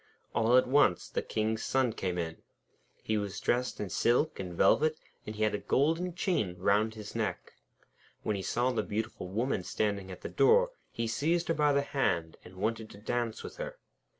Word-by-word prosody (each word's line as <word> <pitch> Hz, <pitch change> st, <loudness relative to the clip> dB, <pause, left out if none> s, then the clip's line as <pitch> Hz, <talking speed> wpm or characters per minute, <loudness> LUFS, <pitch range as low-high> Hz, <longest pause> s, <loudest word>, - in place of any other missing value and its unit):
All 115 Hz, +3 st, +4 dB
at 130 Hz, -, +4 dB
once 130 Hz, -9 st, +3 dB
the -, -, -1 dB
King's 110 Hz, 0 st, -1 dB
son 130 Hz, -3 st, +1 dB
came 90 Hz, -5 st, -2 dB
in. 80 Hz, -1 st, -4 dB, 0.6 s
He 110 Hz, -1 st, 0 dB
was 100 Hz, -2 st, -4 dB
dressed 125 Hz, +1 st, 0 dB
in 100 Hz, -3 st, -4 dB
silk 125 Hz, +7 st, +2 dB
and 90 Hz, -2 st, -4 dB
velvet, 155 Hz, -, +3 dB, 0.3 s
and 110 Hz, -, -5 dB
he 110 Hz, -, -1 dB
had 110 Hz, -, +2 dB
a 105 Hz, -, -1 dB
golden 165 Hz, -, +1 dB
chain 170 Hz, -, 0 dB
round 105 Hz, +4 st, +2 dB
his 105 Hz, -2 st, -8 dB
neck. 105 Hz, -6 st, -3 dB, 0.7 s
When 105 Hz, -, 0 dB
he 95 Hz, -, -3 dB
saw 120 Hz, +6 st, +1 dB
the 115 Hz, -3 st, 0 dB
beautiful 110 Hz, -2 st, -4 dB
Woman 110 Hz, +3 st, -1 dB
standing 100 Hz, +1 st, -2 dB
at 90 Hz, -, -9 dB
the -, -, -4 dB
door, -, -, +4 dB, 0.2 s
he 115 Hz, -, -2 dB
seized 165 Hz, +10 st, 0 dB
her -, -, +4 dB
by 150 Hz, -2 st, +3 dB
the 140 Hz, 0 st, +2 dB
hand, 85 Hz, -, -1 dB
and 95 Hz, -, -13 dB
wanted 110 Hz, +3 st, -2 dB
to -, -, -12 dB
dance 115 Hz, +2 st, -2 dB
with -, -, -8 dB
her. -, -, -5 dB
110 Hz, 195 wpm, -31 LUFS, 100-140 Hz, 0.7 s, All